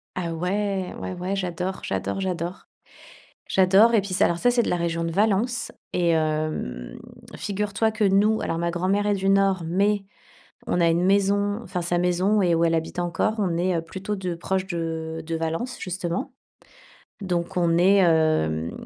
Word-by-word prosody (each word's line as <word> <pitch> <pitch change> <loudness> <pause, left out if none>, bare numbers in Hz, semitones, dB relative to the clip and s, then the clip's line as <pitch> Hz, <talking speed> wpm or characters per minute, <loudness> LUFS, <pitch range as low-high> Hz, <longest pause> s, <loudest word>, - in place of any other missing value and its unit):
Ah 170 -2 -3
ouais! 190 +2 -2
Ouais, 185 - -5
ouais, 180 +2 -3
j'adore, 185 0 -3
j'adore, - - -2
j'adore. 180 -1 -4 0.8
J'adore, 195 +5 +5
et 220 - +5
puis 190 -1 -6
ça - - +3
alors, 170 - 0
c'est 245 +5 +3
de - - -2
la - - +1
région 170 -1 -1
de 165 - -2
Valence 215 +5 +1 0.2
et 175 -1 +1
hem, 155 - -1 0.4
figure 205 0 -3
toi 220 +2 +2
que 220 0 -2
nous, 205 +3 +3
alors 165 - -2
ma 170 0 -1
grand 175 +2 -1
mère 205 +1 +1
est 205 - +3
du 195 0 0
Nord, 195 -2 +3
mais 200 +4 +1 0.7
on 175 - +1
a 170 - +4
une 170 +2 +2
maison, 200 +2 +2
enfin 180 -3 -4
sa 175 +1 0
maison 180 +4 +2
et 175 -2 +3
où 165 +1 +2
elle 165 0 +2
habite 165 +2 -3
encore, 175 +5 0
on 180 -5 0
est, 180 0 +1
heu, 165 - -1
plutôt 190 +5 -5
de 185 -3 -3
proches 190 +2 -2
de 165 -2 -4
de 165 - -3
Valence, 165 +10 -3
justement. 185 +5 -3 0.9
Donc 175 -2 -2
on 170 -1 +2
est, 190 +3 +5
hem, 155 - +2
180 Hz, 185 wpm, -24 LUFS, 170-200 Hz, 0.9 s, J'adore